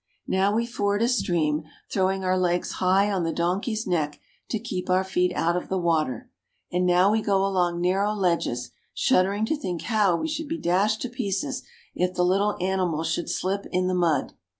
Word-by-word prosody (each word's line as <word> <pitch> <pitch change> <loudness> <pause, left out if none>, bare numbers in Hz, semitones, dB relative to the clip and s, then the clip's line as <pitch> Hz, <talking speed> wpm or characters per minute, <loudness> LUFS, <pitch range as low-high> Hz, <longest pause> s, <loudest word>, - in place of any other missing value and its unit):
Now 195 +2 +1
we 230 +1 +1
ford 205 -3 0
a - - +3
stream, 165 -11 +1 0.3
throwing 190 0 +1
our 185 0 +2
legs 180 -1 0
high 190 +3 +3
on 190 -2 0
the 165 - 0
donkey's 190 +7 -1
neck 155 -5 -1 0.3
to 225 - 0
keep 200 -5 -5
our 185 +1 +3
feet 180 -1 +1
out 170 +1 +1
of 180 - -3
the 190 - 0
water, 160 -8 0 0.4
and 180 +1 +1
now 180 +3 +4
we 220 +1 +2
go 195 -2 +2
along 180 -3 +1
narrow 195 +4 +1
ledges, 170 - -1 0.2
shuddering 200 -2 +2
to 315 - 0
think 180 - -4
how 210 -6 +2
we 315 - -2
should 315 0 -3
be 325 +3 -3
dashed 200 - +1
to 250 - -3
pieces 255 +3 -2 0.3
if 180 0 -1
the 180 - +2
little 200 +3 +2
animals 180 -4 0
should 170 - -2
slip 195 +2 -2
in 185 0 +1
the 185 - 0
mud. 170 -6 +1
185 Hz, 195 wpm, -25 LUFS, 175-205 Hz, 0.4 s, now